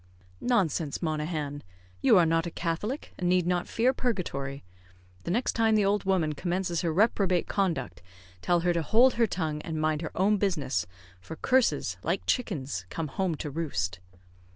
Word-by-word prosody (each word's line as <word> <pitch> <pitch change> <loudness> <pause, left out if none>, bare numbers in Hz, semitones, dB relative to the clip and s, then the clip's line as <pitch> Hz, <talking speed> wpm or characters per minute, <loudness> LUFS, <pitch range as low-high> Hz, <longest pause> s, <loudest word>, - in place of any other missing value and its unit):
"Nonsense, 175 - 0
Monaghan! 150 -2 -2 0.4
you - - +6
are 175 - +6
not 165 +1 +1
a - - -2
Catholic, 175 - -3
and 180 -2 0
need 180 -1 +3
not 175 0 0
fear 245 +3 +2
purgatory. 140 - -3 0.6
The - - -3
next 235 +8 +1
time 225 -1 +2
the 210 -2 +3
old 200 0 +1
woman 180 -6 +1
commences 175 +2 -1
her 170 - 0
reprobate 190 -1 +2
conduct, 180 - -1 0.4
tell 175 - +2
her 175 0 +2
to 170 - 0
hold 235 - +5
her 230 -1 +2
tongue, 155 -5 -2
and 160 -1 -4
mind 155 0 0
her 160 - -3
own 205 +3 +3
business, 140 - -1 0.3
for 160 - -9
curses, 155 - +1
like 170 +4 -1
chickens 140 - -2
come 160 -2 -4
home 180 +2 -1
to 150 0 -5
roost." 90 - -2
170 Hz, 170 wpm, -28 LUFS, 150-195 Hz, 0.6 s, you